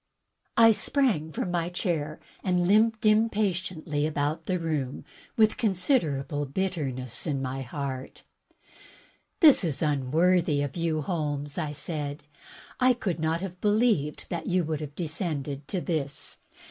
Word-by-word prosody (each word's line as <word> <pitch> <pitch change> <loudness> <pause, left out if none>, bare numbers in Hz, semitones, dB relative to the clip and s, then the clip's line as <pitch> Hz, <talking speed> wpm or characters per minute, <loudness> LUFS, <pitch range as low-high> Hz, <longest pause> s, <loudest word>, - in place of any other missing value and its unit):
I 225 0 +8
sprang 215 - +1
from 175 +4 -3
my 170 -1 0
chair 160 -4 -2 0.2
and 180 -2 +2
limped 220 +2 +3
impatiently 185 -8 +1
about 155 +1 -2
the 185 - +1
room 155 -6 -3 0.3
with 220 -1 +4
considerable 165 - +1
bitterness 135 -7 -2
in 140 -3 0
my 135 0 -3
heart. 135 0 -5 1.2
"This 300 - +8
is 160 -2 0
unworthy 155 +2 +2
of 140 - -4
you. 165 -3 0
Holmes," 145 -3 -2
I 155 -3 -2
said. 145 -1 -4 0.6
"I 255 0 +5
could 185 -8 -2
not 160 +2 0
have 180 -2 -6
believed 210 -8 +1
that 170 - -3
you 180 0 +2
would 155 -1 -2
have 145 -1 -7
descended 150 -4 -3
to 190 - -1
this. 155 -5 -3
160 Hz, 135 wpm, -27 LUFS, 145-185 Hz, 1.2 s, I